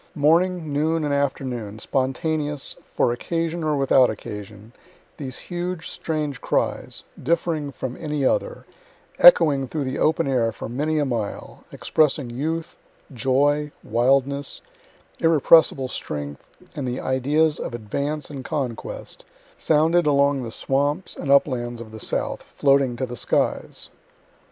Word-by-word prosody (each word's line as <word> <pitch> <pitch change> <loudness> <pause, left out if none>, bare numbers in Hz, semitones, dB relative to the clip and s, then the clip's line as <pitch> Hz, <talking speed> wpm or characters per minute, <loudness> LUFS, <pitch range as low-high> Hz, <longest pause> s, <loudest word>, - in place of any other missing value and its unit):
Morning, 165 +1 +2
noon, 160 +2 +1
and 145 - 0
afternoon, 130 -6 -2
spontaneous, 145 +4 -1 0.2
for 120 - +2
occasion 165 +5 -2
or 155 -2 +1
without 135 -2 +4
occasion, 105 +1 -8 0.4
these 135 -4 -5
huge, 175 -1 -4
strange 150 -5 -3
cries, - - -1 0.2
differing 160 -1 0
from 130 -1 -5
any 150 -4 -2
other, - - 0 0.5
echoing 150 - +7
through 150 +2 -3
the 130 0 -3
open 160 0 +2
air 120 -4 +1
for 110 - -7
many 150 +6 -1
a 150 - +2
mile, 115 -6 -4
expressing 145 -5 +1
youth, 160 +6 -3 0.4
joy, 145 +4 +1
wildness, 135 +4 +1 0.6
irrepressible 160 -4 +5
strength, 75 - -5 0.3
and 135 -3 -3
the 125 +1 -2
ideas 145 +4 +1
of 120 - -4
advance 140 +7 -3
and 135 -3 -6
conquest, 125 -4 -5 0.3
sounded 160 +2 +3
along 140 -1 +3
the 120 - -5
swamps 145 +9 -1
and 140 - -5
uplands 120 -4 +2
of 115 -2 -9
the 110 - -9
South, - - -2
floating 135 -3 +2
to 130 - -2
the 125 -1 -7
skies. - - -1
140 Hz, 130 wpm, -23 LUFS, 125-155 Hz, 0.6 s, echoing